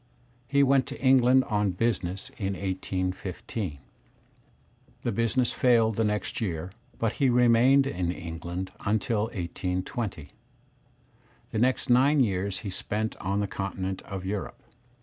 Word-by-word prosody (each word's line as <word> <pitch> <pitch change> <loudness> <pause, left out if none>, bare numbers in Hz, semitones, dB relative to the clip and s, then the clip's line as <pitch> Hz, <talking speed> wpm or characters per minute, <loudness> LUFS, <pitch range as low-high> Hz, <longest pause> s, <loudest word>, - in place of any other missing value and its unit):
He 140 +1 +4
went 135 -1 +3
to - - -7
England 130 0 +5
on 105 -5 0
business 95 -3 -1
in 100 -2 -1
1815. 95 -1 -3 1.3
The 120 - 0
business 115 +3 +1
failed 115 -3 +3
the 115 - +1
next 105 +1 -2
year, 90 -3 -3 0.3
but 115 -2 0
he 135 - +5
remained 125 +3 +5
in 90 -9 -1
England 85 +1 -5
until 110 +1 +1
1820. 90 - -4 1.2
The 110 - -1
next 125 +1 +1
nine 135 +4 +5
years 100 -5 0
he 100 - -5
spent 110 +3 -2
on 100 +3 -1
the 100 - -1
continent 95 -1 -4
of 95 -2 -7
Europe. 100 +1 -4
105 Hz, 130 wpm, -27 LUFS, 95-120 Hz, 1.3 s, England